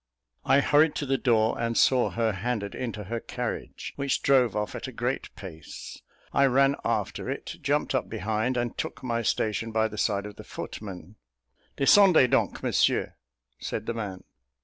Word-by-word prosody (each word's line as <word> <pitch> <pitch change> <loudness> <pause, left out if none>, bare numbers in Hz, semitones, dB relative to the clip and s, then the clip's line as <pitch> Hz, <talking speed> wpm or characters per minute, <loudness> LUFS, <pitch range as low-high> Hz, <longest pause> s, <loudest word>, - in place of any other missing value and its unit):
I 140 - +5
hurried 150 +2 +4
to 145 - -2
the 135 0 0
door, 115 -4 +2
and 115 0 -1
saw 130 -2 +4
her 115 -1 0
handed 100 +1 -3
into 115 -4 -4
her 115 +4 -4
carriage, - - -5
which 140 -1 -1
drove 130 -4 +4
off 105 0 -2
at - - -5
a - - -6
great 125 +2 -2
pace. 85 -8 -9 0.3
I 140 0 +5
ran 135 +2 +4
after 110 -4 -2
it, - - -5
jumped - - 0
up - - -1
behind, 110 +5 -1
and 120 -1 -2
took - - -5
my 115 -2 -1
station 115 0 -1
by 110 0 +2
the 105 -1 -7
side 100 -2 0
of 105 -1 -9
the - - -9
footman. 95 -1 -8 0.6
"Descendez 165 -2 +6
donc, - - +1
Monsieur," - - +2 0.5
said 110 - -4
the 115 - -2
man. 100 -5 -5
115 Hz, 170 wpm, -27 LUFS, 105-130 Hz, 0.6 s, Descendez